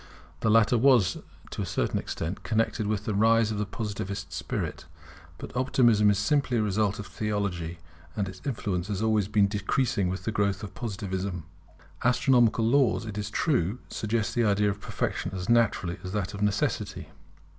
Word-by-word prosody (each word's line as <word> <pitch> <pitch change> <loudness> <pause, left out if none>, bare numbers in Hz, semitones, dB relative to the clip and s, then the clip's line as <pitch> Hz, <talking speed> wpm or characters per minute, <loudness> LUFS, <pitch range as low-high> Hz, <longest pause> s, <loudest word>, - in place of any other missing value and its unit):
The 110 - +1
latter 115 +2 +4
was, 120 -8 +4 0.3
to - - -4
a - - -1
certain - - 0
extent, 80 +4 -4
connected 110 -1 0
with 105 -1 -1
the 110 - -1
rise 110 +2 +4
of 105 - -3
the 105 - -1
Positive 100 -2 -4
spirit; - - -4 0.5
but - - -9
Optimism 120 -5 +4
is 100 - +3
simply 130 +3 +1
a - - +2
result 105 0 0
of 105 - -6
Theology; 100 -7 -3 0.4
and 100 -2 -1
its 95 -1 -9
influence 100 -9 -2
has 105 0 -2
always 110 -3 +2
been 105 -1 +3
decreasing 100 0 0
with 95 +2 -4
the 110 - -1
growth 100 -2 0
of 105 - -7
Positivism. 95 -5 -4 0.6
Astronomical 120 -2 +3
laws, 120 -1 +3
it 105 -1 -5
is 105 0 -3
true, 110 - +1
suggest 110 0 -1
the 120 - +2
idea 105 -1 +3
of 100 0 -8
perfection - - -3
as 90 +2 -5
naturally 100 -6 +2
as 90 0 -6
that 105 -1 -2
of 100 - -6
necessity. 105 0 -1
105 Hz, 175 wpm, -27 LUFS, 100-115 Hz, 0.6 s, latter